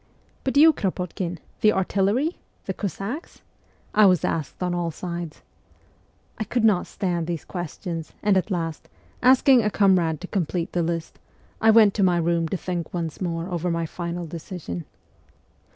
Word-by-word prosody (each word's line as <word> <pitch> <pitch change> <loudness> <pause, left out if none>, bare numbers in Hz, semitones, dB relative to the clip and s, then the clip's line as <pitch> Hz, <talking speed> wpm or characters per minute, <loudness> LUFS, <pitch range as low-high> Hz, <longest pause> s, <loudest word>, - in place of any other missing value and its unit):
'But 270 +1 0
you, 315 +2 +8
Kropotkin? 180 - -3 0.2
The 215 - +5
artillery? 200 - +1 0.3
The - - -2
Cossacks? 205 - -5 0.2
' - - -35
I 205 - +9
was 180 -2 +3
asked 155 +2 -3
on 180 -1 0
all 175 -1 -1
sides. 170 -1 -6 1.0
I - - 0
could 225 +2 -1
not 210 -5 +3
stand 175 -4 -2
these 170 -3 -3
questions, 175 -2 -5
and 205 -2 +4
at 190 +2 +1
last, 165 -4 -3 0.3
asking 260 0 +6
a 210 - +1
comrade 185 -6 +3
to - - -5
complete 175 -3 -2
the 175 - 0
list, 165 0 -3 0.4
I 225 - +5
went 220 -2 +7
to 210 - -1
my 180 -2 +4
room 170 0 +1
to 190 - -2
think 175 -2 -4
once 165 -1 -4
more 170 -1 -2
over 175 0 -1
my 165 -1 0
final 170 +1 -4
decision. 160 - -6
180 Hz, 165 wpm, -24 LUFS, 170-200 Hz, 1.0 s, I